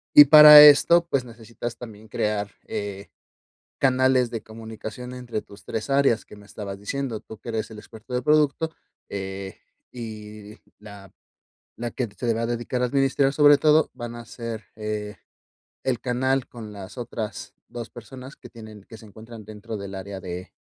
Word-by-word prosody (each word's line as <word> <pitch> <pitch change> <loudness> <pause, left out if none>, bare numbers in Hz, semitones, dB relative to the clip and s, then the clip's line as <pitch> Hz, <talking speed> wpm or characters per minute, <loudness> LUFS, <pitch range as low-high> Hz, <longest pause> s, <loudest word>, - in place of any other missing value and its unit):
y 145 - +12
para 150 0 +11
esto, 170 +4 +7
pues, 135 -5 0
necesitas 115 0 -8
también 110 -2 -11
crear, 105 -1 -2 0.2
eh, 100 -1 -6 0.7
canales 130 -2 +3
de 115 - -4
comunicación 110 +2 -9
entre 120 -4 -5
tus 100 - -16
3 110 +4 -5
áreas 135 -5 +2
que - - -14
me 105 0 -16
estabas 100 -2 -8
diciendo, 125 +1 -4
tú 110 - -12
que - - -9
eres 110 -1 -3
el 110 - -10
experto 110 +3 -15
de 125 - 0
producto, 150 +1 +2 0.4
eh, 95 0 -6 0.3
y 110 -2 -9 0.2
la 100 -2 -13 0.7
la 120 0 -4
que 125 0 -3
se 120 - -5
le 115 - +2
va 115 - -2
a - - 0
dedicar 120 +1 -3
a - - +3
administrar 135 +1 +1
sobre 145 0 +6
todo 155 +1 +3
van 120 -2 -7
a 120 - -9
ser, 115 -2 -7
eh, 105 -1 -5 0.7
el 125 -3 -1
canal 130 +1 -1
con 110 -3 -10
las 100 +2 -10
otras 115 -3 -6
2 120 -1 -8
personas 130 +4 -11
que - - -13
tienen 110 -3 -12
que 115 - -12
se 110 - -15
encuentran 110 +2 -12
dentro 110 +1 -8
del 100 -1 -8
área 95 0 -7
de. 90 +1 -7
115 Hz, 175 wpm, -24 LUFS, 105-130 Hz, 0.7 s, y